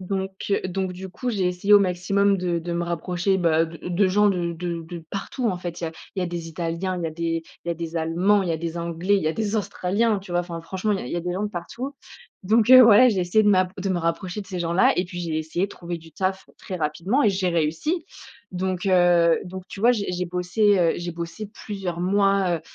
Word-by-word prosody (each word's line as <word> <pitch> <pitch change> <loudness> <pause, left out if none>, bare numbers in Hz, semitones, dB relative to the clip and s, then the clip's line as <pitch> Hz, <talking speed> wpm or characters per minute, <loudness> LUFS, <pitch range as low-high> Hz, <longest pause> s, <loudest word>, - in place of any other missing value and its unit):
donc 190 +1 -3 0.2
heu, 200 - +2
donc 185 0 -2
du 190 +1 -8
coup, 250 +7 -5
j'ai 195 -6 +1
essayé 180 +3 0
au 205 - +9
maximum 195 +2 +2
de 175 -2 -1
de 170 +1 -5
me 170 0 -1
rapprocher, 175 +3 -1
bah, 165 -2 +3
de 165 0 -9
de 185 +3 +2
gens 205 +2 +3
de 175 -3 -1
de 170 0 -4
de 170 0 -8
partout, 230 +4 -3
en 185 - -1
fait! 175 -1 -6
Il - - -3
y - - -1
a 160 - -10 0.2
il 190 - -2
y - - +1
a - - -1
des 170 -1 -5
italiens, 170 +3 -3
il 175 - -4
y 165 - -1
a - - -7
des 165 0 -2 0.2
il - - -6
y - - +1
a - - -6
des 165 0 -5
allemands, 180 +5 +2
il - - -3
y - - +1
a 160 - -1
des 170 +1 -4
anglais, 170 +4 0
il 195 - -1
y - - 0
a 155 - +2
des 220 +1 -1
australiens, 205 +2 0
tu 185 - -13
vois, 175 - +1
enfin, 170 -1 -6
franchement, 190 +5 -2
il 195 - -1
y - - -6
a - - -7
il - - -6
y - - -1
a - - -1
des 175 +1 -3
gens 190 +3 -2
de 210 - -1
partout, 240 +10 -6 0.5
donc 225 +4 +3
heu, 255 0 +11
ouais, 235 +3 +7
j'ai 195 - -1
essayé 180 +5 +3
de 210 - +3
m'a 185 -2 +4
de 195 0 -3
me 185 -2 0
rapprocher 175 +4 -2
de 195 - -9
ces 185 -2 -5
gens-là 170 +2 +3
et 180 - +1
puis, 175 0 -8
j'ai 165 -2 -2
essayé 160 +4 -1
de - - -16
trouver 170 -1 -6
du 160 -1 -16
taf 190 +2 -2
très 185 - -6
rapidement 170 - 0
et - - +6
j'ai 190 -1 0
réussi, 170 - -1 0.5
donc 185 +1 -2
heu, 175 -2 +4
donc 185 0 -8
tu 195 - -8
vois, 240 +2 +5
j'ai 210 -5 0
j'ai 180 0 -2
bossé, 180 +4 +2
heu, 170 -2 +3
j'ai 175 0 -4
bossé 170 +5 -6
plusieurs 190 -5 -4
mois, 195 -2 +2
heu, - - -15
180 Hz, 275 wpm, -24 LUFS, 170-200 Hz, 0.5 s, heu